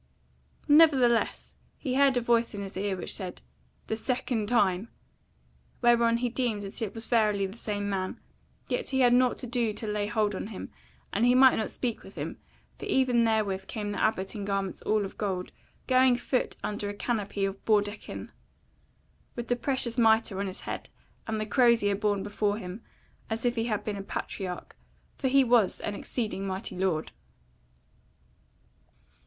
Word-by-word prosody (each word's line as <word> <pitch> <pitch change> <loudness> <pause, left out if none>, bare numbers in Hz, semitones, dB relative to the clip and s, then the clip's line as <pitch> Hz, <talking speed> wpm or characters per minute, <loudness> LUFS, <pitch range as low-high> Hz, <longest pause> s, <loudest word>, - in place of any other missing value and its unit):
Nevertheless, 280 -7 +4 0.2
he 260 - -3
heard 275 -1 +4
a - - +2
voice 235 -1 +2
in 200 - -4
his 195 - -8
ear, 195 0 -1
which 180 - -3
said, 185 -2 -6 0.4
"The 220 - -2
second 230 -2 -1
time!" 205 -3 +2 0.9
whereon 235 -1 +5
he 245 +1 -1
deemed 235 -4 -1
that 200 +4 -8
it 220 -1 -3
was 225 0 -3
verily 210 -4 +2
that 195 +4 -8
same 205 -1 -3
man: 190 -2 -2 0.5
yet - - -2
had - - -6
he 265 -2 +4
nought 250 0 +3
to - - -5
do 235 -2 0
to 220 - -6
lay 210 -1 -1
hold 210 -1 +1
on 190 - -4
him, 215 -3 -8 0.4
and 215 - +1
he 245 +1 +5
might 260 0 +7
not 220 - -1
speak 240 -3 -3
with - - -14
him, - - -5 0.4
for - - -6
even 250 -3 +3
therewith 205 -4 0
came 205 -2 -4
the 205 - -3
Abbot 195 -3 0
in 210 -3 -5
garments 195 -1 -2
all 215 -1 +1
of 195 - -10
gold, 190 -3 -2 0.3
going 255 -1 +5
a - - -5
foot 255 +1 -1
under 205 -1 -3
a 205 - -5
canopy 205 -3 -1
of 195 0 -5
baudekyn, 205 -1 -1 1.0
with 240 -1 -5
the 245 - +3
precious 250 -1 0
mitre 220 -3 +4
on 200 - -1
his 185 - -7
head, - - -5 0.4
and 220 -1 -1
the 215 - -1
crozier 230 -3 +4
borne 205 -1 0
before 205 0 -1
him, 190 +1 -7 0.5
as 225 +2 -3
if 240 - +3
he 225 -1 0
had 215 -3 -1
been 210 -2 -3
a - - -4
patriarch: 190 -1 -5 0.4
for 270 - 0
he 270 +1 +5
was 235 -6 +3
an 210 - -3
exceeding 205 -2 -3
mighty 190 0 -4
lord. 180 -4 -1
215 Hz, 180 wpm, -28 LUFS, 200-240 Hz, 1.0 s, might